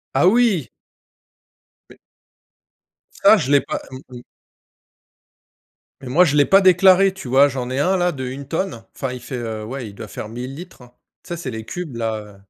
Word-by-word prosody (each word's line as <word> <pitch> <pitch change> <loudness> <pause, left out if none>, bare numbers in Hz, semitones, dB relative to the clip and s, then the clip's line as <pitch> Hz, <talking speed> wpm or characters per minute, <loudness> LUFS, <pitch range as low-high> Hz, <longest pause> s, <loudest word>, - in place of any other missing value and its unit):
Ah 180 - +4
oui! 200 - +2 1.2
Mai - - -16 1.3
Ah - - +7
je 135 - -2
l'ai 140 - +5
pas, - - -4
mmh 130 - -8 0.2
mh 120 - -12 1.8
mais 130 - -9
moi, 175 +8 +5
je 150 -3 0
l'ai 145 - +5
pas 195 +1 +5
déclaré, 190 +1 +5
tu 190 -9 -10
vois. 135 +3 +5
J'en 130 -3 -4
ai 130 +2 -2
1 185 +6 +2
là, 180 0 +1
de 130 -4 -6
1 135 +2 -7
tonne, 165 -6 -3
enfin, 135 - -4
il 125 - -7
fait, 130 - -7
heu, 110 -2 -5
ouais 125 +1 -6
il 100 - -12
doit - - -9
faire 105 - -8
1000 125 +4 -7
litres. 175 -5 -12 0.4
Tu 180 - -17
sais 170 - -4
c'est 135 -7 -6
les 110 0 -7
cubes 175 -9 -6
là, 115 -1 -2
heu 105 -1 -13
135 Hz, 195 wpm, -20 LUFS, 125-180 Hz, 1.8 s, Ah